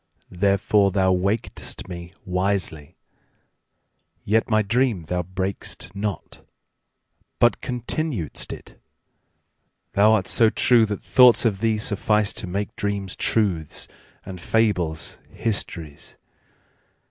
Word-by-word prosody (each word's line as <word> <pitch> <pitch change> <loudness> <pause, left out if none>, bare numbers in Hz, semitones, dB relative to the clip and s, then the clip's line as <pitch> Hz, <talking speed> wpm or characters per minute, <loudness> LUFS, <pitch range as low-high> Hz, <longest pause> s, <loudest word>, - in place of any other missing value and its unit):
Therefore 100 +2 +2
thou 95 -1 +2
waked'st 100 +3 -2
me 85 -1 -8
wisely; 90 -5 -1 1.3
yetMy 110 0 +1
dream 115 -5 +1
thou 90 +3 -2
brak'st 95 +1 -5
not, 100 -1 -5 0.9
but 120 - +2
continued'st 125 - -3
it:Thou 105 +2 -5
art 100 -4 +1
so 115 -2 +5
true 115 0 +3
that 105 -2 -5
thoughts 125 -1 +6
of 105 -4 +1
thee 110 0 +1
sufficeTo 105 -1 +1
make 100 +2 -4
dreams 100 -2 -3
truths 90 -9 0 0.4
and 90 -2 -9
fables 90 -8 -1
histories. 85 -9 -3
100 Hz, 95 wpm, -23 LUFS, 90-110 Hz, 1.3 s, thoughts